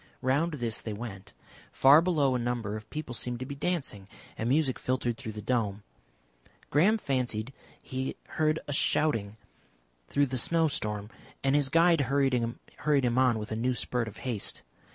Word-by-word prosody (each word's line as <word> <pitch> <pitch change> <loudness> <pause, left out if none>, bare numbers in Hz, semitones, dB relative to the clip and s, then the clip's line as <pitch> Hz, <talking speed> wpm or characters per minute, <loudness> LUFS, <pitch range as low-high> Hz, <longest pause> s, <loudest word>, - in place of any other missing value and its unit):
Round 145 +6 +2
this 120 -6 -2
they 110 - -4
went. 100 -3 -8 0.4
Far 140 +4 +7
below 155 -7 +2
a 125 - 0
number 120 -3 -2
of 110 0 -8
people 150 -5 -5
seemed 120 0 -4
to 130 - -4
be 140 - -6
dancing, 140 - -3 0.3
and 115 - -2
music 140 -1 +2
filtered 125 -2 -1
through 110 -1 -7
the 105 0 -7
dome.... 105 -5 -1 0.9
Graham 190 +10 +4
fancied 125 - -2 0.3
he 130 0 -4
heard 155 0 +1
a 145 - -2
shouting 110 -8 +2 0.7
through 145 - +2
the 130 -1 -3
snowstorm, 115 -10 0 0.3
and 135 0 +2
his 145 -2 +3
guide 165 +1 +4
hurried 135 0 +2
him 125 +2 0
on 125 -3 +4
with 105 0 -6
a - - -1
new 125 +3 0
spurt 120 0 -1
of 110 - -9
haste. 115 -6 -1
130 Hz, 165 wpm, -29 LUFS, 115-145 Hz, 0.9 s, Far